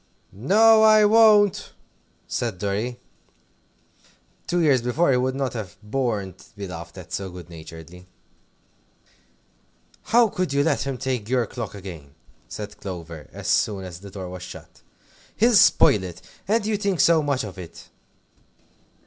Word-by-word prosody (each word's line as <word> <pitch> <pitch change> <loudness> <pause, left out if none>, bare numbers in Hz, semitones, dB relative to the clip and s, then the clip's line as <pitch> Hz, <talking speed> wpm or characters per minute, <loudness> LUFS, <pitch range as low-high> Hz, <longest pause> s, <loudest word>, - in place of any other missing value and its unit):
"No, 220 - +5
I 215 -1 +6
won't!" 210 -2 +4 0.5
said 115 -6 -3
Dorry. 105 +6 -3 1.5
Two 175 - -1
years 145 -7 +3
before 130 +6 +1
he 125 - +3
would 130 +1 -1
not 135 -2 -2
have 105 -7 -7
borne 105 -5 -2
to 95 - -19
be 100 -1 -6
laughed 85 -2 -9
at - - -10
so 95 -1 -3
good 90 -1 -11
naturedly. 80 +2 -12 2.0
"How 235 +1 +4
could 180 -7 -2
you 140 0 +2
let 145 -3 0
him 135 -2 -3
take 125 -5 -3
your 125 -2 +1
clock 115 -2 -7
again?" 85 -8 -10 0.3
said 105 -1 -8
Clover, 85 -6 -8
as - - -8
soon 100 -3 +1
as 90 -2 -9
the 100 +1 -11
door 95 -1 -7
was 90 0 -8
shut. 90 - -11 0.5
"He'll 235 +3 +3
spoil 110 - +5
it. 90 -1 -9 0.2
And 215 +1 +1
you 215 -1 0
think 200 -4 -1
so 165 +2 +5
much 140 -4 -1
of 100 -3 -8
it." 85 -3 -11
120 Hz, 150 wpm, -23 LUFS, -, 2.0 s, I